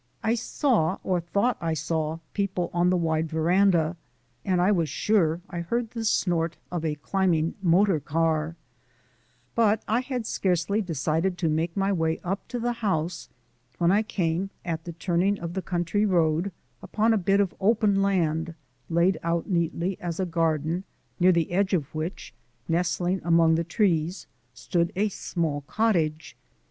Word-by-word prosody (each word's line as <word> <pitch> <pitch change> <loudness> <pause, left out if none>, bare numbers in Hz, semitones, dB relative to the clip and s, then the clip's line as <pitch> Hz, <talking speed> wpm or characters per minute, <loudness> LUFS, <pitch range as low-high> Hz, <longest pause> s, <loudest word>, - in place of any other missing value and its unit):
I 220 - +2
saw, 235 - +1
or 185 -2 +1
thought 200 +8 0
I 165 -1 -1
saw, 155 +1 -2 0.2
people 190 -4 -1
on 175 +1 +3
the 180 - +3
wide 160 -1 0
veranda, 170 +1 +2 0.5
and 185 -2 +1
I 180 +3 +4
was 170 -6 +1
sure 170 -1 +1
I 175 - -5
heard 230 +7 -2
the 230 -2 -4
snort 170 -6 +1
of 175 -2 -3
a 155 -2 -1
climbing 170 0 0
motor 185 -1 +3
car, 160 +2 0 1.0
but 220 -2 +2
I 225 +3 +2
had 250 -3 -4
scarcely 190 +1 0
decided 165 +1 -1
to 165 -3 0
make 165 +3 -1
my 195 +1 +2
way 160 -2 0
up 190 +2 -3
to 245 - -4
the 240 +1 0
house 180 -7 -2 0.5
when 170 0 +3
I 205 +2 +4
came, 185 -3 -1 0.2
at 160 -2 -3
the 170 - -6
turning 180 +4 0
of 170 0 -5
the 190 - -2
country 175 +3 -1
road, 170 0 +2 0.3
upon 225 +1 +1
a - - +3
bit 195 +2 +2
of 200 -3 +1
open 205 -1 +3
land 165 -4 0 0.3
laid 170 +1 +2
out 170 +4 -1
neatly 170 +2 -1
as 170 -1 -4
a 190 - +1
garden, 165 0 0 0.4
near 180 +1 +6
the 170 -2 +1
edge 195 +2 +2
of 145 -6 -3
which, 160 +4 -5 0.3
nestling 175 +2 0
among 165 -1 +4
the 165 +1 +1
trees, 170 -1 0 0.3
stood 170 +7 0
a 210 +3 +1
small 165 -6 -2
cottage. 165 -9 0
175 Hz, 160 wpm, -26 LUFS, 165-195 Hz, 1.0 s, near